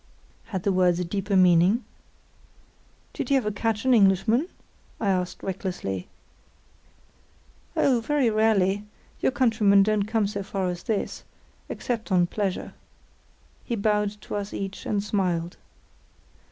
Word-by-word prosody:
Had 190 -5 -4
the 200 - +2
words 180 -2 +3
a 180 - -1
deeper 195 +3 -2
meaning? 185 +5 +4 1.3
"Do - - -2
you 275 - +5
ever 210 -5 -1
catch 225 +2 -2
an 260 - +5
Englishman?" 215 - +3 0.5
I 205 - 0
asked, 180 -2 -1
recklessly. 180 - -4 1.7
"Oh, 250 -4 +3
very 290 -1 +1
rarely; 205 -2 +2 0.4
your - - +2
countrymen 220 -7 +4
don't 210 -1 +1
come 220 -1 +1
so 200 0 -3
far 195 -1 -2
as 175 -1 -5
this—except 225 +1 -5
on 180 -2 +4
pleasure." 195 +1 -3 0.9
He 235 - -2
bowed 210 -1 0
to - - -8
us 205 0 -5
each 195 0 -5
and 205 -1 0
smiled. 180 -5 -1
200 Hz, 125 wpm, -25 LUFS, 185-220 Hz, 1.7 s, you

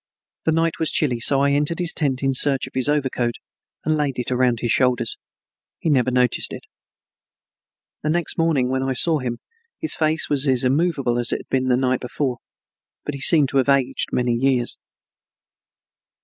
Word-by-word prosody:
The 160 - +3
night 165 0 0
was 160 - +1
chilly 125 -6 0
so 135 +3 +3
I 140 0 +2
entered 145 +3 0
his 175 -2 0
tent 135 -3 -1
in 135 0 +1
search 135 0 +2
of 130 - -13
his 130 +2 +1
overcoat 130 -5 0 0.5
and 155 - +2
laid 145 -3 -1
it 125 0 -3
around 125 -2 +1
his 120 - 0
shoulders. 125 -3 +1 0.6
He 160 - -1
never 130 -3 +2
noticed 125 -1 +1
it. - - -8 1.4
The 150 - -2
next 170 +1 -1
morning 155 -7 +1
when 130 0 0
I 135 0 -1
saw 155 +4 +3
him 120 -2 -4 0.4
his 320 - -1
face 155 0 +1
was 145 0 +1
as 130 -2 +2
immovable 135 -3 +1
as 120 - +1
it - - -2
had - - -21
been 130 -1 0
the 125 -1 +3
night 130 -1 0
before, 125 0 -3 0.7
but 145 - -3
he 140 - -7
seemed 150 -3 +4
to 140 - -1
have 135 +1 +2
aged 140 -2 +1
by - - -2
many 120 -1 0
years. 125 0 0
135 Hz, 190 wpm, -21 LUFS, 125-150 Hz, 1.4 s, seemed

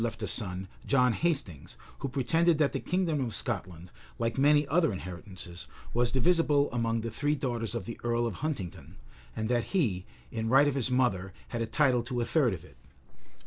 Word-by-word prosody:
left 115 -1 -3
a - - -1
son, 95 -3 -2 0.2
John 125 -3 +4
Hastings, 135 - -2 0.2
who 140 - -3
pretended 160 +6 +2
that 150 -2 +3
the - - -1
kingdom 170 -6 0
of 115 -3 -3
Scotland, 90 -6 -4 0.3
like 115 -1 -1
many 145 +1 +4
other 160 +1 +3
inheritances, 90 -2 -8 0.3
was 120 0 +2
divisible 145 0 +3
among 115 -1 0
the 115 0 -4
three 145 +1 0
daughters 120 -5 -2
of 110 -6 -3
the 115 - -7
earl 120 0 +1
of 115 -5 -3
Huntingdon, 140 - -4 0.4
and 110 - -2
that 120 -1 +1
he, 100 - 0 0.2
in 110 -1 -2
right 135 +4 +6
of 145 - +1
his 130 -3 0
mother, 100 -8 +1 0.2
had 120 - -3
a 115 - -1
title 130 -1 +3
to 120 +1 -3
a 120 - +1
third 130 - +2
of 80 - -11
it. 70 -7 -18
120 Hz, 190 wpm, -30 LUFS, 110-140 Hz, 0.4 s, right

